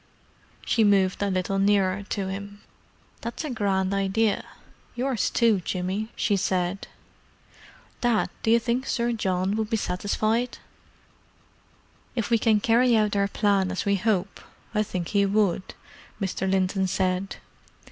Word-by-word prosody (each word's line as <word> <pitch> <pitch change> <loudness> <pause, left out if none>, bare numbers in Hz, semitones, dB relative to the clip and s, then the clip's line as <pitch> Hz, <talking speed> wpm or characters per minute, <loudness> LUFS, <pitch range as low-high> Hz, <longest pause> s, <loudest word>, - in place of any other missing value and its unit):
She 225 - +2
moved 195 -3 +3
a 200 - +1
little 190 +1 -1
nearer 195 -1 +2
to 195 -2 -2
him. 200 +1 -7 0.6
"That's 235 +7 -5
a 305 - -4
grand 195 -4 0
idea—yours 220 +5 -2
too, 230 -4 +3
Jimmy," 185 +4 -3
she 205 - +1
said. 185 0 -1 1.1
"Dad, 240 -3 +1
do - - -1
you 230 - +6
think 245 +3 -1
Sir 235 -1 0
John 190 -3 0
would 220 -1 -2
be 225 - +1
satisfied?" 215 +5 -1 1.6
"If 230 -2 -2
we 230 - +4
can 215 -2 +3
carry 235 +1 +4
out 210 -1 +1
our 200 0 +2
plan 200 -2 +1
as 185 - -3
we 200 - +2
hope, 195 -1 -1 0.3
I 210 - +2
think 180 -5 -3
he 200 -1 +2
would," 195 -2 0 0.4
Mr. 190 -1 -2
Linton 190 0 +1
said. 185 +1 -1
200 Hz, 135 wpm, -25 LUFS, 190-225 Hz, 1.6 s, you